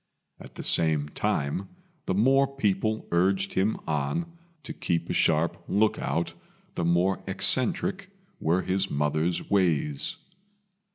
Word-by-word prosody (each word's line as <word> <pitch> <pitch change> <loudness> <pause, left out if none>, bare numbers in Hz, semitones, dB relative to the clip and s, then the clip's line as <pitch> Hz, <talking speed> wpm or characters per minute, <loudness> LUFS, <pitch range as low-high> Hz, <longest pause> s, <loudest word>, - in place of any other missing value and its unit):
At - - -13
the - - -7
same 75 -3 +3
time, 75 +6 -2 0.4
the 95 - 0
more 135 +6 +4
people 110 -5 -1
urged 95 +3 +1
him 100 +4 +1
on 125 - -2 0.3
to - - -7
keep 85 -2 -2
a - - 0
sharp 80 +1 +1
look 110 +2 +2
out, 85 +3 -2 0.4
the - - -3
more 90 +3 +2
eccentric 170 - +2 0.3
were 85 +4 +1
his 95 +1 0
mother's 75 +4 -1
ways. 80 -7 +1
95 Hz, 125 wpm, -27 LUFS, 80-105 Hz, 0.4 s, more